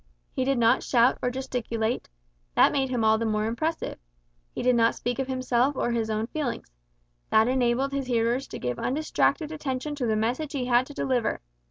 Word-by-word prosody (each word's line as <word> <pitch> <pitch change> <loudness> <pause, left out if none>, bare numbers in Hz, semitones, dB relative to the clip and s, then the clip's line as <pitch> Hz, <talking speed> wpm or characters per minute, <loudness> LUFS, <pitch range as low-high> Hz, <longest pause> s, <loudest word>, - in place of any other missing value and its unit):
He 260 - -1
did 270 0 +1
not 235 +2 +4
shout 240 0 +3
or 250 - +1
gesticulate: 245 -3 -3 0.5
that - - +6
made 270 -2 0
him 245 -3 0
all 220 0 +4
the 230 - -1
more 215 0 0
impressive. 310 +9 -2 0.5
He - - -5
did 250 0 +4
not 230 -1 +3
speak 245 +1 -3
of 265 - -1
himself 255 +1 +1
or 240 - 0
his 230 -2 -1
own 215 0 -1
feelings: 250 - -4 0.6
that 220 +1 +4
enabled 255 +1 +1
his 275 -2 -3
hearers 240 +2 0
to - - -7
give 125 -1 -3
undistracted 310 +2 0
attention 295 -1 -3
to 270 -5 -2
the 220 - +1
message 250 +8 -1
he 265 -3 -2
had 245 +1 +3
to 290 - -11
deliver. 250 -4 0
250 Hz, 195 wpm, -26 LUFS, 230-270 Hz, 0.6 s, that